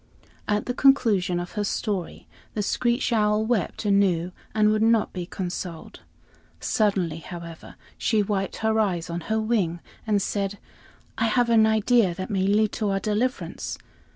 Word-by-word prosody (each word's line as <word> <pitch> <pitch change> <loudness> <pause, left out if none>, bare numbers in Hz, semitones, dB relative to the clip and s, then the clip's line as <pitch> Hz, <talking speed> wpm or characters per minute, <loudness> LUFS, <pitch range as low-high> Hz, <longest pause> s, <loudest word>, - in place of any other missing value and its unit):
At 210 0 0
the 245 - -2
conclusion 210 -10 +3
of 175 - -5
her 210 - -2
story, 200 -3 -3 0.3
the 210 - 0
screech 240 +4 0
owl 210 -1 +2
wept 220 -3 -1
anew 190 -4 +2 0.2
and 215 -1 +4
would 215 0 +1
not 225 -1 +3
be 180 -2 -5
consoled. 175 -3 -6 0.6
Suddenly, 190 -7 0
however, 170 -1 -9 0.2
she 215 -2 +2
wiped 195 -2 -2
her 220 0 +2
eyes 180 -6 0
on 170 +1 -3
her 220 0 +2
wing 210 -7 0 0.3
and 210 -2 +3
said: 200 0 -2 0.6
"I 225 - +2
have 235 +1 +2
an 220 -1 +6
idea 220 -3 +3
that 185 +4 -5
may 190 -1 +1
lead 210 +1 +3
to 215 -3 -1
our 195 0 +1
deliverance. 215 +6 -2
210 Hz, 155 wpm, -25 LUFS, 185-220 Hz, 0.6 s, an